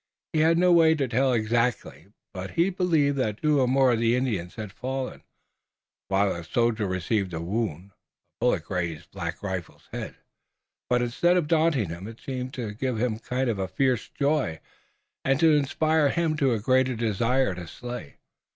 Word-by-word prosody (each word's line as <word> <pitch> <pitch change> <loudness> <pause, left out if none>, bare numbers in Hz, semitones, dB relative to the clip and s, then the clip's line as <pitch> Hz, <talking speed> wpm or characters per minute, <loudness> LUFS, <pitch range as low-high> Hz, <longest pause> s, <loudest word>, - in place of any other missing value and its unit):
He 155 - +2
had 165 +2 +4
no 180 +1 +4
way 165 -2 +6
to 140 -4 0
tell 130 +3 +2
exactly, 115 -1 0 0.3
but 95 0 -5
he 175 +4 +3
believed 160 -6 +2
that 110 -5 -1
two 145 -4 +3
more 130 0 +4
of 115 - +1
the 115 +1 +3
Indians 110 -9 -2
had 105 -3 -6
fallen, 130 +2 -4 0.9
while 100 0 +2
a 85 - -6
soldier 110 +3 0
received 95 0 -1
a - - -3
wound. 95 0 -3
A 105 - -16
bullet 110 -9 +2
grazed 85 -3 -4
Black 85 -1 -5
Rifle's 95 -4 -6
head, - - -6 0.7
but 125 0 +2
instead 175 +9 +2
of 170 -4 0
daunting 155 - +2
him 85 +4 -7
it 115 0 -10
seemed 130 -1 -5
to 115 -5 -4
give 125 +2 -2
him 110 -1 0
a - - -15
kind 125 +2 -2
of 95 -5 -1
fierce 130 -1 +1
joy, 140 - 0 0.6
and 135 0 +2
to 165 -1 +5
inspire 155 +1 +2
in 165 +2 +1
him 140 -3 +2
a 115 - +1
greater 130 +3 +2
desire 115 +1 +1
to 90 -1 -8
slay. 120 -3 -8
120 Hz, 180 wpm, -26 LUFS, 100-135 Hz, 0.9 s, way